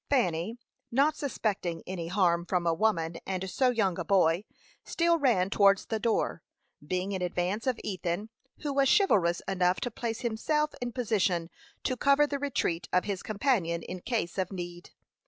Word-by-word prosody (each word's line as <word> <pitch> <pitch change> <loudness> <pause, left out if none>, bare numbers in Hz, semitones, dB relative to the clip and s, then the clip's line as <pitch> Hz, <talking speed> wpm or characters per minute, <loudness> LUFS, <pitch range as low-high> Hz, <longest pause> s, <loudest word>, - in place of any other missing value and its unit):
Fanny, 220 - +1 0.3
not 280 +5 +3
suspecting 200 - -2
any 175 -3 -4
harm 175 -2 +2
from 180 -2 0
a 165 - +3
woman 165 -4 0
and 190 0 -2
so 255 +7 +2
young 200 -7 +1
a - - -1
boy, 180 0 +3 0.4
still 335 0 +2
ran 200 -9 +2
towards 200 -1 +4
the 220 - -2
door, 220 -6 0 0.4
being 185 +5 -2
in 190 -2 -2
advance 180 +6 -1
of 250 -3 +1
Ethan, 185 +1 -3 0.3
who 290 -2 -2
was 275 -1 +3
chivalrous 180 - +2
enough 180 -1 +2
to 245 - -2
place 225 0 -4
himself 300 +7 0
in 245 0 -2
position 200 -8 0 0.3
to 255 - 0
cover 280 +3 +4
the 285 -1 -3
retreat 240 -12 -1
of 180 - +3
his 200 -3 -3
companion 200 -7 0
in 185 - -6
case 215 -6 -2
of 185 0 -1
need. 175 -2 -7
195 Hz, 170 wpm, -29 LUFS, 175-245 Hz, 0.4 s, towards